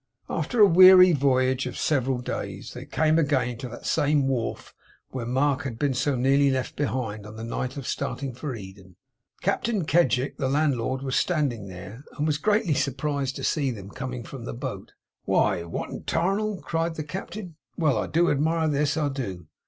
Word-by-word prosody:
After 165 +9 -2
a 210 - +10
weary 185 0 +8
voyage 130 -2 +2
of - - -6
several 135 -3 +1
days, 125 - -5
they - - -8
came 160 +1 +2
again 130 -6 0
to 130 -1 -6
that 120 - -10
same 145 -2 +2
wharf 125 -4 -3 0.4
where 125 -3 -4
Mark 135 +2 +1
had 125 -5 -5
been 140 +1 +1
so 130 +3 0
nearly 135 +3 +3
left 130 -1 -2
behind, 115 -7 -3
on 105 - -10
the 110 - -7
night 125 +3 -4
of 140 - -6
starting 135 +2 -3
for 130 +1 -5
Eden. 95 -3 -11 0.5
Captain 200 0 0
Kedgick, 145 -5 +2
the 130 - -1
landlord, 135 -3 0
was 130 -2 -2
standing 140 - 0
there, 95 +7 -9
and 150 - 0
was 150 -1 0
greatly 210 -2 +2
surprised 140 -1 -1
to - - -6
see 145 -4 +1
them 100 -5 -7
coming 130 -2 -5
from 125 -2 -9
the - - -5
boat. 120 - -6 0.3
'Why, 95 -4 +2
what 85 - -5
the - - -5
'tarnal!' 195 +4 -1
cried 165 0 -1
the 155 - -4
Captain. 180 +2 -7 0.2
'Well! 145 -9 +2
I - - -2
do 175 +2 +2
admire 160 +3 +1
at 155 - +1
this, 145 +1 +1
I 150 -2 +1
do! 100 - -5
140 Hz, 190 wpm, -26 LUFS, 125-155 Hz, 0.5 s, a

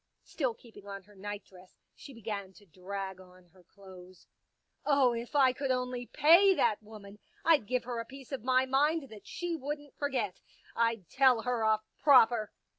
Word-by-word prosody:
Still 255 -7 -2
keeping 220 -4 -16
on 195 -1 -7
her 205 +2 -20
nightdress 195 -2 -9 0.2
she 280 - -13
began 205 -5 -6
to 205 - -19
drag 190 +2 -7
on 185 0 -18
her 185 +2 -22
clothes. 185 -1 -15 0.3
" - - -50
Oh, 275 -4 +3
if 235 +4 -6
I 265 -3 +5
could 275 +1 -3
only 250 -1 -2
pay 350 +7 +6
that 215 - +1
woman, 210 -1 -13 0.3
I'd 305 -10 +4
give 250 -1 0
her 240 -1 -4
a 230 - -4
piece 270 +1 -13
of 270 -5 -5
my 255 +1 +3
mind 280 +2 +1
that 215 -2 -13
she 350 -1 -3
wouldn't 290 -1 -6
forget. 255 -10 -2 0.3
I'd 230 -6 0
tell 260 -4 +3
her 245 -2 -1
off 220 0 +2 0.2
proper." 240 -6 +5
230 Hz, 180 wpm, -31 LUFS, 200-270 Hz, 0.3 s, pay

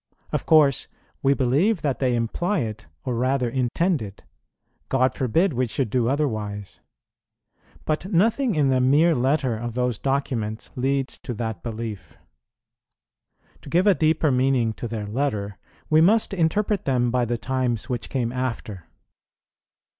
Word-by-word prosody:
Of - - -2
course 150 -5 +4 0.3
we 140 +1 +3
believe 150 - +1
that 140 -4 -1
they 125 -2 +1
imply 175 - -1
it, 115 0 -5 0.2
or 125 - -1
rather 130 +1 +1
intend 130 +6 0
it. 100 -2 -9 0.7
God 130 -1 +2
forbid 160 - +1
we 125 0 0
should 115 -1 -2
do 120 -1 +1
otherwise! 110 -8 -2 1.1
But 160 +6 -2
nothing 225 +6 +2
in 145 -3 +3
the 130 -1 +2
mere 150 +6 +4
letter 130 -2 +1
of 120 +1 -5
those 125 -3 -1
documents 125 -6 -2
leads 135 +1 -1
to 125 - -6
that 110 -4 -4
belief. 110 -9 -6 1.4
To - - -11
give 175 +6 +2
a 205 - +6
deeper 155 -2 +2
meaning 125 -3 +2
to 120 - -6
their 110 -2 -4
letter, 105 -4 -2 0.3
we 155 0 +4
must 210 +5 +3
interpret 195 +3 0
them 125 -3 +1
by 125 0 +1
the 120 0 -1
times 120 0 -2
which 125 -3 -4
came 120 -3 -1
after. 115 -8 -4
130 Hz, 145 wpm, -24 LUFS, 115-150 Hz, 1.4 s, a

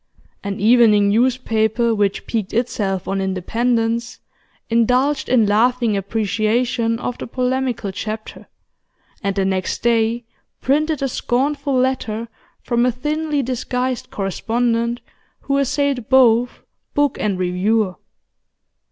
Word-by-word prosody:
An 200 0 -4
evening 215 -2 +5
newspaper 230 0 +1
which 205 -2 0
piqued 215 -4 -3
itself 200 -6 -1
on 195 0 -1
independence 230 +5 -1 0.5
indulged 250 +5 +1
in 245 -4 +4
laughing 230 +2 +2
appreciation 225 +4 0
of 245 +1 -5
the - - -5
polemical 255 -4 -1
chapter, 215 +3 -6 0.7
and 200 -1 -1
the 195 -1 +1
next 190 -1 -2
day 230 0 +1 0.3
printed 300 +1 0
a - - +2
scornful 275 +3 -1
letter 240 -3 -1 0.3
from 240 -1 +1
a 250 - +3
thinly 295 +3 -2
disguised 250 0 -2
correspondent 230 +4 -1 0.4
who 275 0 0
assailed 275 -3 0
both 245 -2 +4 0.3
book 290 -2 +1
and 200 -3 0
reviewer. 185 +3 +1
235 Hz, 110 wpm, -20 LUFS, 215-255 Hz, 0.7 s, evening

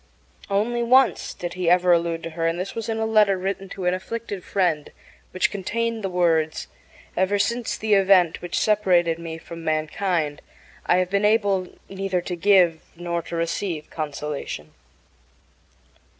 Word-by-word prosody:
Only 220 +5 0
once 255 +3 +3
did 175 -1 -6
he 180 -2 0
ever 180 0 +4
allude 170 -1 0
to 165 - -5
her, 165 0 -1
and 165 +1 -1
this 185 +2 -4
was 230 0 -5
in 225 - -1
a 220 - 0
letter 210 -3 +4
written 195 +1 -4
to 190 -1 -6
an 180 - +2
afflicted 200 0 -5
friend, 175 -6 0 0.4
which 185 - 0
contained 230 +3 -2
the 195 - -1
words: 165 -3 +1 0.5
Ever 190 +3 +2
since 230 +4 -1
the 215 -1 0
event 190 -4 +4
which 175 - -2
separated 180 -6 +2
me 165 -1 -6
from 165 0 -10
mankind 155 0 -1 0.5
I 175 - +4
have 185 0 0
been 200 +1 +1
able 205 -3 +2 0.2
neither 195 -1 -2
to 180 0 -4
give 175 -3 +4
nor 170 0 -3
to 170 - -7
receive 165 -1 -3
consolation. 145 - -5
180 Hz, 160 wpm, -23 LUFS, 165-200 Hz, 0.5 s, ever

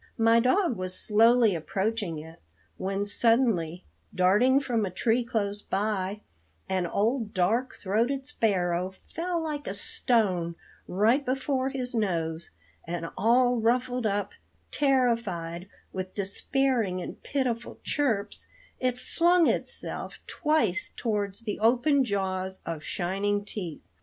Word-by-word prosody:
My 230 +1 +5
dog 260 - +2
was 185 0 -4
slowly 225 0 +4
approaching 190 +2 -2
it, 160 +2 -10 0.4
when, 195 +1 -2
suddenly 205 -7 +3 0.3
darting 210 +9 +4
from 240 -5 -1
a 195 - -1
tree 225 +6 +1
close 210 -4 -2
by, 200 0 -2 0.5
an 185 -2 0
old 220 +3 0
dark 225 +8 +1
throated 235 +8 0
sparrow 185 -7 0
fell 345 +1 -2
like 300 -2 -4
a 195 - -3
stone 190 -6 +1 0.3
right 225 +9 +2
before 265 0 -1
his 255 -2 -3
nose, 170 -7 -1 0.3
and 165 0 -4
all 245 +4 +3
ruffled 245 +1 +1
up, 205 0 -1 0.4
terrified, 230 - 0 0.2
with 185 0 -5
despairing 215 0 0
and 180 - -7
pitiful 245 -4 -2
chirps, 220 -9 -1 0.3
it 255 -1 0
flung 345 +5 +3
itself - - -2
twice 300 - 0
towards 205 -3 -2
the 215 -3 -4
open 255 +6 +3
jaws 190 -3 -2
of 165 -2 -4
shining 200 +4 -1
teeth. 180 -6 -6
215 Hz, 120 wpm, -27 LUFS, 185-250 Hz, 0.5 s, My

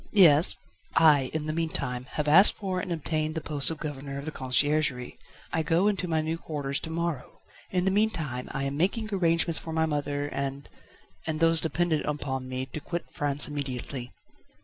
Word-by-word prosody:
"Yes?" 170 -6 +6 0.4
"I, 145 -5 +5
in 155 -1 -3
the 155 - -2
meanwhile, 140 -6 -2
have 150 -1 -2
asked 180 +7 +8
for 190 -3 -3
and 180 - -4
obtained 155 -1 -2
the - - 0
post 150 -2 +1
of 160 - -3
Governor 140 -2 -6
of 140 - -6
the 155 - -4
Conciergerie; 135 -1 0 0.3
I 160 - +2
go 170 +5 +2
into 195 -3 0
my 160 -2 +1
new 160 +1 -3
quarters 140 -4 -3
to - - -7
morrow. 165 -4 -4 0.3
In 180 -1 0
the 190 - +3
meanwhile, 165 - 0
I 135 - -4
am 140 0 -2
making 215 +6 0
arrangements 170 -3 +2
for 160 - -7
my 160 0 +2
mother 145 -2 -2
and 140 0 -4 0.6
and 155 -1 -2
those 165 0 +4
dependent 160 -1 0
upon 130 -3 -3
me 130 0 -3
to 135 +4 -7
quit 170 +3 -5
France 145 0 -1
immediately." 130 -3 -5
155 Hz, 185 wpm, -27 LUFS, 140-165 Hz, 0.6 s, asked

